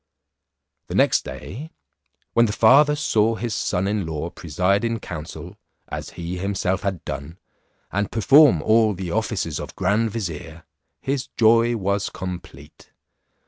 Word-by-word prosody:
The - - -5
next - - +3
day, 145 +10 -8 0.6
when 115 0 +4
the 105 - -2
father 145 +7 +5
saw 115 -7 +1
his 115 0 -3
son 95 -1 -1
in 100 -4 -1
law 80 +1 -4
preside 90 +6 0
in 115 -1 -1
council, 80 -6 -8 0.3
as - - -5
he 85 +1 -4
himself 95 -1 -1
had 95 -4 -3
done, 75 +3 -6 0.5
and 100 +1 -1
perform 130 - +5
all 110 -1 +3
the 90 -1 -5
offices 100 - -2
of - - -8
grand 105 +4 +1
vizier, 85 -6 -6 0.4
his 135 0 -2
joy 115 +1 +4
was 100 0 -1
complete. 90 -6 -9
100 Hz, 140 wpm, -23 LUFS, 85-115 Hz, 0.6 s, father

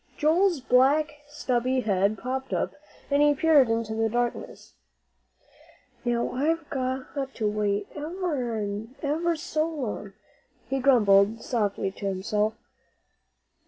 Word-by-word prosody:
Joel's 335 +1 +3
black 290 +4 +3
stubby 255 -3 0
head 200 -1 +1
popped 260 +4 -4
up, - - -1 0.4
and 285 +1 +4
he 295 0 +5
peered 290 -5 +5
into 225 -1 -1
the 225 0 0
darkness. 240 +1 -3 1.3
"Now, 240 -1 0
I've 310 +4 0
got 260 -1 -2 0.3
to 215 - -1
wait 210 -1 0
ever'n 250 - -3
ever 330 +4 0
so 315 -1 -1
long," 235 -10 -5 0.5
he 270 - -1
grumbled 220 -4 +4
softly 205 -5 -1
to 200 +1 -5
himself. 210 +3 -1
250 Hz, 115 wpm, -26 LUFS, 215-295 Hz, 1.3 s, he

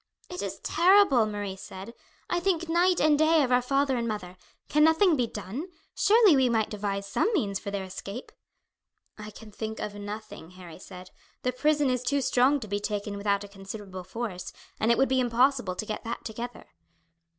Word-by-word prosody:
"It 360 - -5
is - - -4
terrible," 345 - +4
Marie 205 -2 -4
said. 195 +3 -9 0.3
"I 350 - 0
think 345 -2 0
night 350 +2 +3
and 300 -1 +3
day 315 0 +4
of 255 - -1
our 250 0 +4
father 275 +1 +1
and 235 -1 -2
mother. 195 -5 -5 0.3
Can 300 0 +3
nothing 320 +2 +5
be 245 -4 0
done? 215 - -6 0.3
Surely 425 -5 +5
we 260 -2 +3
might 225 -2 0
devise 200 -1 -3
some 200 - 0
means 200 - 0
for 205 - -6
their 200 -1 -3
escape." 195 +5 -8 0.9
"I 210 0 -7
can 215 +1 -13
think 220 +1 -5
of 210 - -4
nothing," 205 -4 -8
Harry 175 -3 -11
said. 185 -1 -11 0.3
"The 250 - +1
prison 295 0 +2
is 250 -1 -1
too 280 +3 0
strong 260 +4 +3
to 215 - -6
be 205 0 -2
taken 205 0 -3
without 200 0 0
a - - -8
considerable 195 -1 -8
force, 185 -2 -5 0.3
and 220 - +1
it 235 - +3
would 270 - +3
be 260 0 +1
impossible 245 -4 +2
to 215 - -4
get 215 - -5
that 230 - -5
together." 235 +2 -7
230 Hz, 195 wpm, -27 LUFS, 200-280 Hz, 0.9 s, nothing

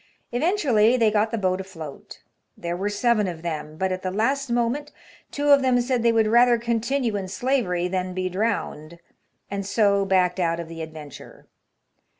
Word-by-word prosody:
Eventually 255 - +2
they 225 -3 +3
got 215 +1 +2
the 230 - -2
boat 185 -2 0
afloat. 165 -7 -10 0.3
There 170 0 -3
were 195 +3 -2
seven 210 0 +1
of 170 -2 -6
them; 155 -2 -5
but, 190 +2 -1
at 185 0 -3
the 185 - -2
last 265 +8 0
moment, 240 +5 -1 0.4
two 290 0 -1
of 280 -1 +7
them 255 -2 +3
said 245 0 0
they 235 0 +4
would 225 -1 +3
rather 240 +2 +5
continue 235 +1 -1
in 195 -2 -3
slavery 195 -5 0
than 185 0 -3
be 185 0 -1
drowned, 185 -5 -3 0.5
and 200 0 -2
so 200 0 +2
backed 185 -1 +2
out 170 -1 0
of 170 - -5
the 165 0 -8
adventure. 155 -3 -10
205 Hz, 175 wpm, -24 LUFS, 180-240 Hz, 0.5 s, of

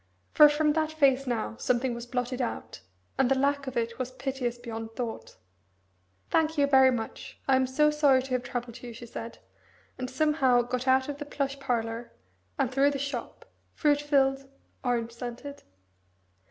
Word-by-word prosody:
For 300 -1 +8
from 300 0 +2
that 315 0 0
face 275 -3 +3
now 220 - -2
something 245 - 0
was 235 0 -7
blotted 250 +1 -2
out, 240 - -5 0.4
and 265 -2 +4
the 270 - +3
lack 280 0 +1
of 260 - -4
it 235 +1 -2
was 255 -1 -2
piteous 255 -2 -3
beyond 225 -2 -7
thought. 235 -3 -5 1.0
"Thank 320 0 +2
you 285 - +4
very 265 -2 +6
much. 230 -3 -5
I 270 - +5
am 260 0 +2
so 300 +4 +3
sorry 285 -4 +4
to 265 - -9
have 250 -1 +1
troubled 245 -1 -6
you," 240 -1 -8
she 235 +1 -9
said, 230 0 -7 0.6
and 255 0 -3
somehow 260 -3 +3
got 250 +2 -3
out 260 0 +4
of 290 -1 -5
the 290 - -5
plush 275 -1 -3
parlour, 235 -3 -2 0.5
and 255 - 0
through 275 +2 +4
the 285 - -2
shop, 275 -3 -5 0.3
fruit 290 -2 +2
filled, 270 -2 +1 0.3
orange 235 -2 0
scented. 245 +4 -7
260 Hz, 175 wpm, -28 LUFS, 240-280 Hz, 1.0 s, For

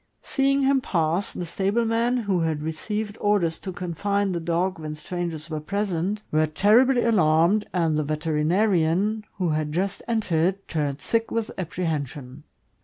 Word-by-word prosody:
Seeing 275 0 +1
him 270 0 +3
pass, 170 -1 0
the 175 - -5
stable 195 +7 0
men, 230 +2 +1
who 200 -6 0
had 160 -2 -1
received 210 +7 -4
orders 200 -6 +1
to 190 - -5
confine 195 +3 -1
the 175 - -1
dog 170 +2 -1
when 155 -1 -5
strangers 170 -1 -4
were 155 -2 -4
present, 200 +3 -2
were 155 0 +3
terribly 235 - +4
alarmed, 185 -1 +3
and 165 -4 +1
the - - +1
veterinarian, 165 +6 +1
who 180 -3 -1
had 155 -1 -1
just 190 +4 -2
entered, 195 -4 0
turned 145 -3 -2
sick 230 0 0
with 230 -1 -2
apprehension. 150 -6 -4
180 Hz, 150 wpm, -25 LUFS, 160-210 Hz, -, terribly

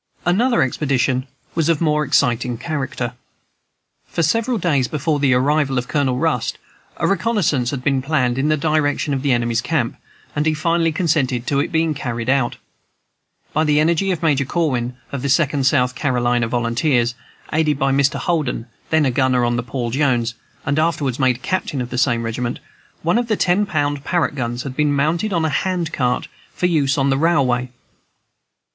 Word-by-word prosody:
Another 230 - +3
expedition 130 -1 0 0.3
was 165 -1 0
of 165 -3 +2
more 150 -2 +2
exciting 125 -3 +1
character. 130 -5 -3 0.9
For 170 - -1
several 230 +9 +1
days 145 - +1
before 150 +1 -1
the 135 -3 +3
arrival 140 +1 +1
of 125 0 -2
Colonel 135 -4 0
Rust 150 -5 0 0.4
a - - -1
reconnaissance 185 - +1
had 130 -2 -4
been 135 -1 +1
planned 130 -3 0
in 145 +3 +1
the 155 - +2
direction 150 -1 0
of 135 - -1
the 140 -1 +1
enemy's 120 -1 +1
camp, 125 -2 -1 0.4
and 150 +1 +1
he 155 - +2
finally 165 +1 +1
consented 145 -7 0
to 140 +1 +1
its - - -1
being 160 -1 +1
carried 120 -3 -2
out. 135 -3 +1 1.0
By 155 - +2
the 150 -1 +3
energy 170 +5 +2
of 175 -3 -2
Major 145 -4 +2
Corwin, 125 -5 -1
of 140 - -4
the 140 - -2
Second 140 -1 +2
South 125 -3 +2
Carolina 125 -4 0
Volunteers, 120 +1 +1 0.4
aided 155 -2 +2
by 135 0 +1
Mr. 140 +1 +2
Holden, 150 -9 -1 0.2
then 160 -2 +3
a 130 - +2
gunner 130 -1 +2
on 120 0 0
the 120 - 0
Paul 120 0 -4
Jones, 125 -4 +1 0.3
and 145 +1 +1
afterwards 150 -6 0
made 130 -2 +1
captain 185 -7 -2
of 125 -1 -4
the 125 - -1
same 120 -3 +2
regiment, 120 +2 -3 0.5
one 175 +8 +2
of 240 - -2
the 215 -3 0
ten 190 +3 +2
pound 145 -5 -1
Parrott 175 -1 0
guns 120 -2 -3
had 135 -2 -6
been 150 0 +2
mounted 160 +9 0
on 170 -3 +1
a - - +1
hand 175 +1 -1
car, 125 -2 0 0.3
for - - -1
use 150 -6 +2
on 140 0 +2
the 135 - +1
railway. 130 -7 +2
140 Hz, 180 wpm, -20 LUFS, 125-160 Hz, 1.0 s, Another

